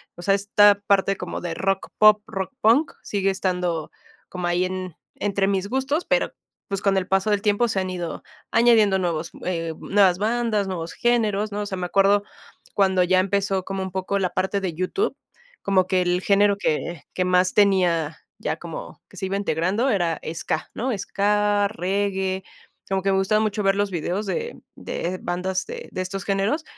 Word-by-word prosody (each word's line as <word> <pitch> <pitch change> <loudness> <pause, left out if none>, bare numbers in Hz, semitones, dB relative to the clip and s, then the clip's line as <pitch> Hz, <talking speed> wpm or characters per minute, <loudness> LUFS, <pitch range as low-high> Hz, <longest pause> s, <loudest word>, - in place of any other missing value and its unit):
o - - -10
sea, 195 +3 +2
esta 205 +1 +5
parte 195 -1 +3
como - - -5
de 175 -2 -3
rock 195 +2 -1
pop, 215 0 +6
rock 200 +4 -4
punk 245 +8 +4
sigue 195 -1 0
estando 180 -4 -1 0.4
como 180 -1 -3
ahí 175 +1 +1
en 185 -2 -5 0.2
entre 200 -1 0
mis 195 0 0
gustos, 265 +7 -1
pero, - - +1 0.4
pues, 195 -1 -2
con 200 -1 +2
el 190 -1 0
paso 195 +2 +1
del 205 -1 +1
tiempo 215 +2 +2
se 200 -4 -1
han 185 - -3
ido 175 -3 -5 0.3
añadiendo 225 -4 +4
nuevos, 170 -2 -2
eh, 165 -3 -2
nuevas 190 -3 +3
bandas, 220 -2 0
nuevos 170 -3 -4
géneros, 215 -3 +1
¿no? 205 +1 -3
O - - -3
sea, 195 -2 -4
me 180 -1 -3
acuerdo 200 +2 +3 0.5
cuando 190 -2 +3
ya 185 +1 +3
empezó 195 0 0
como 195 0 -3
un 190 - -5
poco 190 +1 -1
la 185 -2 0
parte 190 +1 -1
de 180 -4 -2
YouTube, 185 - -1 0.5
como 190 -2 +2
que 185 -1 +2
el 180 0 0
género 200 +1 +3
que 170 -3 -2
que 185 - 0
más 180 0 +3
tenía, 180 -6 +2 0.2
ya - - -3
como - - -8
que - - -16
se 190 - -3
iba 190 +1 -2
integrando, 195 - 0
era 175 -7 0 0.2
Ska, 160 - -3
¿no? 250 +1 -1
Ska, 205 +1 +1
Reggae, 190 -1 -1 0.4
como 195 0 0
que 195 +1 +1
me 190 - +2
gustaba 215 +3 +2
mucho 215 -1 -1
ver 195 0 +3
los 205 0 0
videos 180 +5 -2
de 470 - -4
de 185 +2 -4
bandas 185 +2 -2
de 475 +1 -8
de 185 - -3
estos 185 +1 -4
géneros, 200 +10 0
195 Hz, 190 wpm, -23 LUFS, 185-205 Hz, 0.5 s, pop